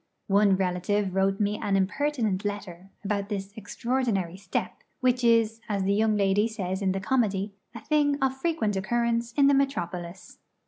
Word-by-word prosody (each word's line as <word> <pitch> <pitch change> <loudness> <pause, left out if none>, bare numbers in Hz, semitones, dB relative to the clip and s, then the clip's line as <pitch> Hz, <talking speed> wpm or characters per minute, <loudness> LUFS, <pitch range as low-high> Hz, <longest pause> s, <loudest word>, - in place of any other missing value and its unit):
One 200 -1 +4
relative 190 +1 0
wrote 195 +1 +1
me 210 0 0
an 200 - 0
impertinent 215 -1 0
letter 195 -3 -5 0.2
about 200 0 -1
this 200 -1 -4
'extraordinary 220 -4 -2
step;' 195 +1 -4 0.2
which 250 -1 +1
is, 225 -1 +3
as 200 -2 0
the 195 +1 +2
young 215 0 +2
lady 200 +2 +2
says 190 -4 -4
in 190 -1 +1
the 195 - -1
comedy, 200 -2 0 0.2
'a 230 - -7
thing 290 -2 +2
of 265 -1 +1
frequent 265 -8 -1
occurrence 235 +3 0
in 280 +2 +4
the 280 - +5
metropolis.' 180 -10 -2
205 Hz, 165 wpm, -27 LUFS, 195-235 Hz, 0.2 s, the